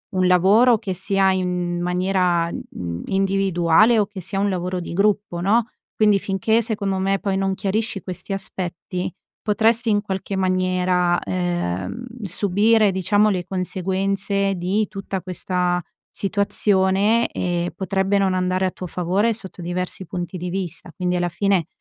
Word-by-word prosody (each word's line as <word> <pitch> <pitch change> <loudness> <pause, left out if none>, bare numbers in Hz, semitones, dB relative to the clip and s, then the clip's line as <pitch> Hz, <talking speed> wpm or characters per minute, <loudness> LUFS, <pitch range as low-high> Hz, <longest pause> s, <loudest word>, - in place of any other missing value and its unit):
un 185 0 +2
lavoro 205 +7 +5
che 190 - -3
sia 195 +1 +2
in 180 -2 -1
maniera, 180 -1 +1
n - - -5
n 85 -1 -5
individuale 195 +2 +3
o 205 - +2
che 195 -3 -8
sia 195 +3 -3
un 200 +1 +2
lavoro 180 0 -2
di 170 - -6
gruppo, 200 -2 +1
no? 225 +5 +2 0.3
Quindi 210 -2 +4
finché 220 +5 +1
secondo 200 -4 -2
me 195 +1 +1
poi 195 -1 -1
non 195 0 0
chiarisci 205 +1 -2
questi 185 +2 -6
aspetti, 180 -2 -4 0.3
potresti 225 +3 +2
in 205 - +2
qualche 195 -1 -4
maniera, 185 -1 +1
ehm, 175 - -2 0.2
subire 205 +3 +3
diciamo 205 +3 +2
le 180 -3 -1
conseguenze 195 +1 -1
di 190 +4 0
tutta 195 -1 -5
questa 180 -1 -1 0.3
situazione, 200 +2 +2
e 175 -1 -2
potrebbe 195 +1 0
non 190 -1 +2
andare 185 +1 +1
a 185 - 0
tuo 180 - -7
favore 190 +7 +1
sotto 190 -5 -9
diversi 180 +2 -4
punti 175 +2 -5
di 180 +1 -4
vista. 180 -2 -5
Quindi 180 -1 -1
alla 175 0 0
fine, 190 -2 +1
190 Hz, 150 wpm, -22 LUFS, 180-200 Hz, 0.3 s, lavoro